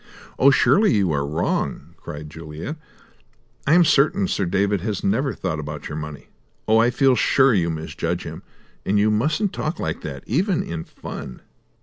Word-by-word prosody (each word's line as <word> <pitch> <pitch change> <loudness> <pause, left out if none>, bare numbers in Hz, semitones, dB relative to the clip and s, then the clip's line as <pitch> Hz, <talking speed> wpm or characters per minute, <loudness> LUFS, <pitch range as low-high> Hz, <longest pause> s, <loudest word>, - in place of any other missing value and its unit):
"Oh, 135 - +7
surely 200 +9 +4
you 95 -5 +2
are 70 -2 0
wrong," 80 +4 -2
cried 75 +1 -8
Juliet. 80 - -7 0.9
"I 150 - +5
am 175 -1 +6
certain 155 +6 +3
Sir 100 - 0
David 100 +1 +1
has 105 -1 -3
never 130 +8 +1
thought 80 - -3
about 75 0 -6
your 75 - -5
money. 75 -2 -7 0.4
Oh, 110 +1 +5
I 115 +2 +4
feel 130 +1 +3
sure 135 +1 +4
you 85 -5 +2
misjudge 80 +2 -3
him; - - -7 0.4
and 105 - +1
you 105 +1 +3
mustn't 150 - 0
talk 155 +2 -3
like 80 -1 -3
that, 70 -3 -7
even 180 - +1
in 85 -1 -5
fun!" 65 - -8
100 Hz, 170 wpm, -22 LUFS, -, 0.9 s, Oh